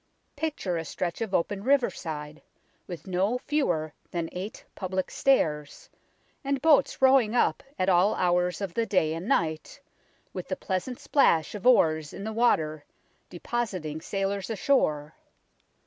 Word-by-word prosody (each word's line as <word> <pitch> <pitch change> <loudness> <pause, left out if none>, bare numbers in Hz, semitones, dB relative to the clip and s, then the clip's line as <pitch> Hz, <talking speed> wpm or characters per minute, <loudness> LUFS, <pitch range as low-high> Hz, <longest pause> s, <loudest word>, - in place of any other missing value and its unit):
Picture 290 - -2
a 165 - -3
stretch 175 +4 -4
of 220 -4 -2
open 195 +2 -1
riverside, 160 - -1 0.5
with 175 -4 -8
no 190 +6 0
fewer 175 - -1 0.2
than 170 -2 -3
eight 190 +4 -7
public 185 -1 -3
stairs, 150 - 0 0.5
and 275 0 0
boats 285 -2 +3
rowing 260 -4 +5
up - - +2 0.2
at 185 - 0
all 185 +2 +4
hours 180 0 +1
of 195 -4 -3
the 230 -1 0
day 160 -5 +2
and 165 +5 -5
night, 160 - -1 0.5
with - - -6
the - - -2
pleasant 195 +6 -3
splash 165 - +2
of 210 +3 -3
oars 160 -11 +4
in 195 - -7
the 220 +1 -4
water, 155 -10 +1 0.5
depositing 180 -6 -4
sailors 195 +2 -2
ashore. 155 - +1
185 Hz, 140 wpm, -27 LUFS, 160-235 Hz, 0.5 s, rowing